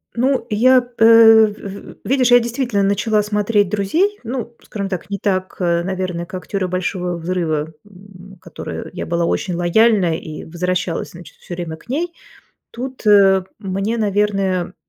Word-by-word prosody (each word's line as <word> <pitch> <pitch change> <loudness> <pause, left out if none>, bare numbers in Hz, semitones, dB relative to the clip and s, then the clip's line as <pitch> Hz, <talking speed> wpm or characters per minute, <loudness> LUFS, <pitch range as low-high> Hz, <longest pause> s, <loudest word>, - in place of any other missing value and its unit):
Ну, 260 +2 +1
я, 250 +3 +4
э, - - +4 0.4
в 210 - -6 0.4
в - - -27
видишь, 255 -1 +2
я 245 - +8
действительно 235 -3 -1
начала 210 +2 +1
смотреть 210 -1 +1
"Друзей", 320 - 0
ну, 235 0 -5
скажем 200 -2 -5
так, 185 -1 -5
не 200 - -3
так, 185 -1 -2
э, 170 -2 +1
наверное, 185 -2 -3
как 185 0 -8
"Теорию 195 -2 -2
Большого 180 -1 -2
взрыва", 160 -3 -2
м, 195 -1 -15
которой 170 -2 -8
я 180 - -5
была 170 0 0
очень 180 +1 -1
лояльная 180 0 +3
и 155 -1 -8
возвращалась, 180 +1 -3
значит, 175 0 -13
всё 175 - -8
время 170 -2 -6
к 165 - -23
ней. 335 +6 -2 0.6
Тут, 255 +1 -7
э, 195 -2 +6 0.2
мне, 195 +2 -2
наверное, 195 -4 0
195 Hz, 155 wpm, -19 LUFS, 180-220 Hz, 0.6 s, я